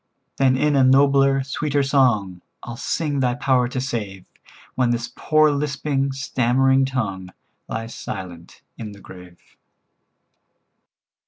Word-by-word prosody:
"Then 130 -1 +3
in 150 +2 +1
a 135 - +4
nobler, 135 +1 +4
sweeter 140 +1 -1
song, 120 -10 +1 0.2
I'll 120 - -7
sing 145 +3 -2
Thy 125 -2 +1
power 125 0 +1
to 125 +1 -4
save, 105 -7 -5 0.5
When 125 -2 +1
this 120 0 -2
poor 155 -1 +3
lisping, 140 -1 -1
stammering 135 0 +1
tongue 100 -8 -3 0.4
Lies 115 +1 -5
silent 85 -2 -8 0.2
in 105 -2 -7
the 100 - -14
grave." 90 -2 -14
130 Hz, 120 wpm, -21 LUFS, 115-140 Hz, 0.5 s, a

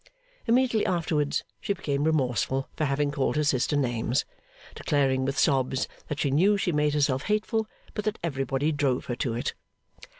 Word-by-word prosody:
Immediately 240 -2 +3
afterwards, 155 -4 0 0.2
she 200 - -1
became 145 -6 -1
remorseful 135 -3 +1
for 155 - 0
having 145 +1 0
called 140 0 0
her 150 - +2
sister 145 0 +1
names; 120 -1 0 0.5
declaring 135 -3 +1
with 135 +1 -2
sobs 130 -1 +2 0.2
that 150 - -3
she 140 - +1
knew 190 +9 +4
she 190 -2 0
made 150 -1 +1
herself 140 -3 +2
hateful, 215 +1 0 0.3
but 210 - -4
that 215 0 -1
everybody 135 -1 0
drove 140 -4 0
her 120 - -3
to 120 -4 -1
it. 120 - -2
145 Hz, 165 wpm, -27 LUFS, 135-165 Hz, 0.5 s, knew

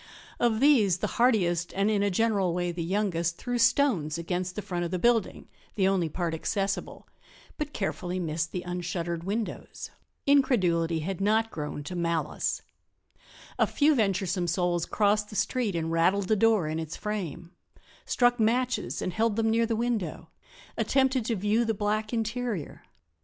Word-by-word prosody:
Of 230 -1 +2
these 230 - +5
the - - -2 0.2
hardiest, 175 -8 +2
and 200 +2 +2
in 205 -2 +1
a 205 - +2
general 195 -3 +1
way 175 -1 -1
the 170 0 -5
youngest, 170 -3 -1
threw 245 -1 -3
stones 230 - +2
against 180 +2 -3
the 210 - -4
front 175 -1 -3
of 170 - -2
the 185 - -1
building, 230 +2 +1 0.3
the 190 -3 +2
only 185 -4 +1
part 170 +1 -2
accessible, 195 +4 -3 0.5
but 300 -1 -3
carefully 185 -5 -3
missed 165 -1 -2
the 180 - -4
unshuttered 175 -1 -3
windows. 210 +3 -4 0.3
Incredulity 180 - +3
had 190 +3 -4
not 220 +2 +2
grown 150 -1 -5
to 180 +5 -6
malice. 170 -3 -1 1.0
A - - +4
few 305 +1 +3
venturesome 190 -6 0
souls 175 0 0
crossed 210 0 +1
the 210 - -9
street 230 -4 0
and 165 -1 -2
rattled 185 +4 +2
the 220 - +4
door 215 -5 +3
in 155 +1 -2
its 160 0 -5
frame; 180 -5 -5 0.5
struck 245 -1 +2
matches 245 +3 0
and 185 - -2
held 220 0 +1
them 225 0 +1
near 230 +1 +2
the 225 - 0
window; 225 -8 -2 0.5
attempted 265 -3 +2
to 230 - 0
view 210 +4 +1
the 225 -1 -1
black 215 +1 -1
interior. 225 - -3
195 Hz, 165 wpm, -28 LUFS, 175-225 Hz, 1.0 s, these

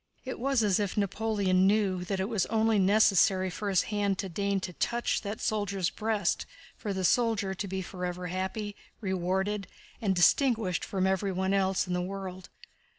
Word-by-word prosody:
It 255 - -5
was 265 -2 +2
as 200 -2 +2
if 205 -1 -2
Napoleon 200 -2 +2
knew 195 -3 +2
that 195 0 -2
it 190 - 0
was 215 -5 0
only 220 -1 +2
necessary 190 -2 +4
for 205 +3 -3
his 190 -3 +3
hand 200 -2 +1
to 195 - -3
deign 200 +2 0
to 180 - -5
touch 235 +7 -1
that 205 0 -5
soldier's 200 -4 -1
breast 215 -4 -1 0.3
for 210 - -4
the 190 -1 -2
soldier 220 -2 +2
to 195 +2 -4
be 190 0 -3
forever 180 0 -5
happy, 190 +4 -3 0.2
rewarded, 190 +1 -1 0.3
and 195 -4 +1
distinguished 220 0 +3
from 190 -2 -1
everyone 190 0 0
else 190 -1 +2
in 180 - -3
the 180 - 0
world. 185 0 -6
195 Hz, 170 wpm, -29 LUFS, 185-210 Hz, 0.3 s, necessary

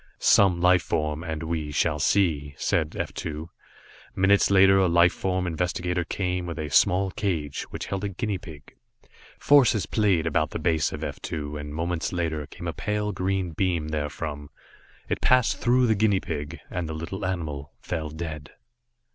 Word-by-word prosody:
"Some 95 -4 +4
life 90 0 +5
form, 75 0 -2
and 80 -1 -4
we 80 -2 -3
shall 75 - +1
see," 75 -8 +1
said 80 -2 0
F - - -3
2. 80 +1 -6 0.6
Minutes 100 +1 +4
later 95 0 +6
a 95 - +4
life 85 0 +4
form 95 -1 -1
investigator 90 +1 -1
came 90 +1 -2
with 85 - -5
a 75 -2 -4
small 95 +6 +3
cage, 85 -9 -2
which - - -5
held 100 0 -4
a 100 - -1
guinea 100 0 -3
pig. 75 -5 -13 0.6
Forces 130 -8 +4
played 100 -7 +1
about 80 -1 +1
the - - -4
base 80 -1 +1
of - - -6
F - - -5
2, 75 -2 -5
and 75 0 -6
moments 85 +1 -2
later, 80 -4 -2
came - - -8
a - - -2
pale 105 0 -2
green 95 -1 -1
beam 85 -2 -1
therefrom. 75 -1 -4 0.6
It - - -2
passed 125 -2 +3
through 125 +1 +3
the 110 - +3
guinea 105 -2 +2
pig, 75 -5 -5
and 85 -3 -3
the 80 - -4
little 85 +5 -5
animal 80 -6 -3
fell 80 -3 -4
dead. 75 -2 -6
85 Hz, 170 wpm, -26 LUFS, 75-95 Hz, 0.6 s, later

